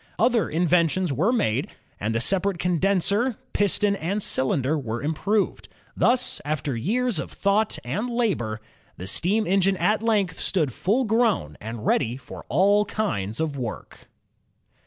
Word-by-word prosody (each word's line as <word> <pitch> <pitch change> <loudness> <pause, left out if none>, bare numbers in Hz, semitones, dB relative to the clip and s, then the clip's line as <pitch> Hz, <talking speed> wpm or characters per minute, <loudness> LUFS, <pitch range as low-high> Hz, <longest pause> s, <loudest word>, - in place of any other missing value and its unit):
Other 230 -6 +2
inventions 170 0 +2
were 175 - +2
made, 215 - 0 0.3
and 110 +3 -2
the - - +2
separate 195 +4 +1
con 175 -1 0
denser, 200 - +1 0.2
piston, 205 0 +2
and 195 +4 -2
cylinder 130 +2 +1
were 120 -5 -4
improved. 195 +8 -1 0.3
Thus, 250 +1 +1
after 145 -3 -2
years 225 - 0
of 140 - -5
thought 205 +2 +1
and 200 - -2
labor, 190 - -1 0.4
the 90 - -7
steam 200 - +1
engine 195 +1 +2
at 215 +3 +1
length 205 -6 +1
stood 155 -10 0
full 230 - +1
grown 220 - +1
and 110 0 -6
ready 120 +3 +1
for 135 - -11
all 200 - +4
kinds 110 - -2
of 150 -4 -2
work. 120 -3 -7
185 Hz, 145 wpm, -24 LUFS, 135-210 Hz, 0.4 s, all